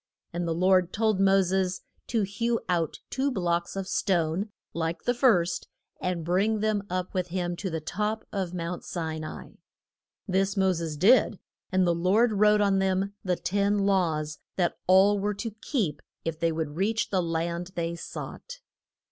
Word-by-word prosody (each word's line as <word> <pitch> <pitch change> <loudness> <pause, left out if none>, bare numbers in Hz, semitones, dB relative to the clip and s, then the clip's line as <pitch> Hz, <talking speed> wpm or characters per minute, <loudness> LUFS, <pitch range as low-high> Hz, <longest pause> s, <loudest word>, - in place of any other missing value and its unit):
And 175 0 -2
the 165 - 0
Lord 185 0 +3
told 220 -2 +1
Mo 195 0 +5
ses 185 0 0 0.3
to 225 -4 +1
hew 230 +4 0
out 170 -3 -1
two 270 +2 +1
blocks 175 -6 -1
of 195 -1 -3
stone 180 +1 0 0.2
like 165 0 -1
to - - -32
the 245 - +3
first, 210 -9 +2 0.3
and 175 -3 -2
bring 200 +5 +2
them 215 -1 +1
up 185 0 -3
with 185 -2 -1
him 175 0 -2
to 190 - -3
the 160 -2 -3
top 210 +7 -2
of 190 -4 -2
Mount 175 0 -4
Si 160 -2 -4
na 155 - -6
i. - - -14 0.7
This 195 +1 +1
Mo 190 -1 +3
ses 165 -3 -4
did, 215 - +5 0.3
and 185 0 +3
the 175 - +3
Lord 195 +8 +3
wrote 210 +1 +4
on 200 -1 +3
them 190 +1 0
the 180 -2 +1
Ten 200 +3 +1
Laws 170 -7 +1 0.2
that 175 -2 +1
all 195 +2 +6
were 205 +1 -1
to 225 +3 -4
keep 205 - -1 0.2
if 165 -1 -3
they 165 0 +2
would 160 -1 -3
reach 220 +4 0
the 190 -2 +2
land 170 +1 -2
they 170 0 -2
sought. - - -8
185 Hz, 180 wpm, -27 LUFS, 170-205 Hz, 0.7 s, all